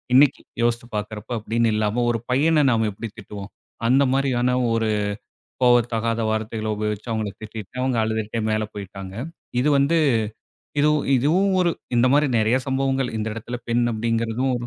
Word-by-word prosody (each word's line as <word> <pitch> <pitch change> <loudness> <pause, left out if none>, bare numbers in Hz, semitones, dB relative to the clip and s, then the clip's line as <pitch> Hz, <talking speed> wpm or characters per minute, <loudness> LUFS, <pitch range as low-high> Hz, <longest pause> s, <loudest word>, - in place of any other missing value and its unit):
இன்னைக்கு 140 +1 +5 0.2
யோசிச்சு 120 0 0
பாக்கிறப்ப 105 +2 -4
அப்டின்னு 115 +1 +1
இல்லாம, 110 +3 +1
ஒரு 115 -2 -2
பையன 150 +3 +4
நாம 110 -2 +2
எப்படி 115 +3 -6
திட்டுவோம்? 100 -1 -8 0.4
அந்த 135 +3 +5
மாரியான 125 -2 +1 0.2
ஒரு 115 -1 +1 0.7
கோவத்தகாத 115 -2 +3
வார்த்தைகள 110 0 -2
உபயோகிச்சு, 105 +1 -3
அவுங்கள 110 -2 -1
திட்டிட்டேன். 110 +2 -7
அவுங்க 130 -2 +1
அழுதுட்டே 110 0 -2
மேல 110 0 +1
போயிட்டாங்க. 95 -1 -8 0.5
இது 150 - +2
வந்து 145 +5 +3 0.8
இதுவு 150 +1 +4 0.2
இதுவும் 170 +10 +2
ஒரு 175 -1 +3 0.2
இந்த 120 +1 +4
மாரி 145 +1 +4
நெறயா 110 +4 +3
சம்பவங்கள். 135 -1 0
இந்த 110 - -2
எடத்தில, 115 +2 -5
பெண் 120 +1 +2
அப்படிங்கிறதும் 115 +3 0
115 Hz, 145 wpm, -23 LUFS, 110-130 Hz, 0.8 s, இன்னைக்கு